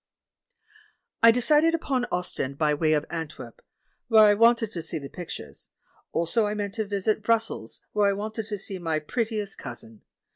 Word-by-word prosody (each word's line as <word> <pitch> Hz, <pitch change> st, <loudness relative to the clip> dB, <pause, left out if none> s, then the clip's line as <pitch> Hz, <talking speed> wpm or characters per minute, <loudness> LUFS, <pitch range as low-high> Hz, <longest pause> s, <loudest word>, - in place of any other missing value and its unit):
I 230 Hz, -, +9 dB
decided 300 Hz, +7 st, +4 dB
upon 265 Hz, -6 st, -1 dB
Ostend, 140 Hz, -6 st, -2 dB
by 150 Hz, -1 st, +2 dB
way 155 Hz, +1 st, +2 dB
of 150 Hz, 0 st, +1 dB
Antwerp, 165 Hz, -, -7 dB, 0.5 s
where 220 Hz, -2 st, +7 dB
I 205 Hz, -, +6 dB
wanted 230 Hz, 0 st, +4 dB
to 170 Hz, -, -4 dB
see 165 Hz, +1 st, -5 dB
the 140 Hz, -2 st, -7 dB
pictures; 175 Hz, -2 st, -8 dB, 0.4 s
also 205 Hz, +7 st, +2 dB
I 210 Hz, -, -2 dB
meant 205 Hz, -1 st, -3 dB
to 220 Hz, 0 st, -2 dB
visit 205 Hz, +1 st, 0 dB
Brussels, 225 Hz, -, -1 dB
where 205 Hz, -1 st, +3 dB
I -, -, +1 dB
wanted 215 Hz, +2 st, -4 dB
to 210 Hz, -2 st, -3 dB
see 195 Hz, -1 st, -6 dB
my 165 Hz, -2 st, -1 dB
pret 220 Hz, +10 st, -2 dB
tiest 210 Hz, -3 st, -5 dB
cousin. 115 Hz, -4 st, -7 dB
205 Hz, 175 wpm, -26 LUFS, 165-225 Hz, 0.5 s, I